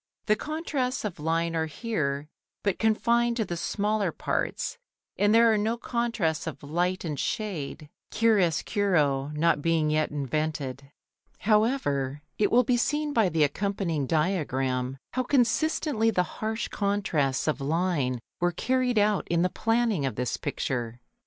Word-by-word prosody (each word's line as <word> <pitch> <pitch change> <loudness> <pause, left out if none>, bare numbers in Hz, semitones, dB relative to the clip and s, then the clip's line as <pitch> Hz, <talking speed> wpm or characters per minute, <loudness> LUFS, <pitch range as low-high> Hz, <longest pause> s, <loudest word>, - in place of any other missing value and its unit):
The 215 - +4
contrasts 285 -3 -2
of 195 -7 -4
line 165 +2 0
are 160 0 0
here 150 -6 -2 0.4
but 200 -3 0
confined 235 +2 +2
to 220 - 0
the 175 - -4
smaller 205 +1 0
parts, 480 - -2 0.4
and 205 +1 +3
there 230 0 +6
are 215 - +2
no 220 +3 0
contrasts 230 -11 -1
of 160 - -6
light 175 +5 -1
and 150 -4 -3
shade, 175 -9 -3 0.2
chiaroscuro 180 -8 +2
not 160 -1 +2
being 160 -1 +2
yet 155 0 +1
invented. 140 -1 -3 0.5
However, 175 - +1 0.2
it 205 - +3
will 245 +2 +5
be 245 +1 +2
seen 295 +4 0
by 220 -7 +3
the 160 -2 +2
accompanying 165 -2 -1
diagram 135 -6 0 0.2
how 255 - +1
consistently 255 -1 +2
the 185 -5 +2 0.2
harsh 220 +1 -1
contrasts 175 -11 0
of 155 -2 0
line 150 -4 0 0.2
were 175 0 +2
carried 250 +6 0
out 205 -1 +2
in 170 0 +2
the 180 - +2
planning 225 - +1
of 130 - -4
this 125 +1 -1
picture. 120 -4 -3
180 Hz, 145 wpm, -27 LUFS, 150-225 Hz, 0.5 s, there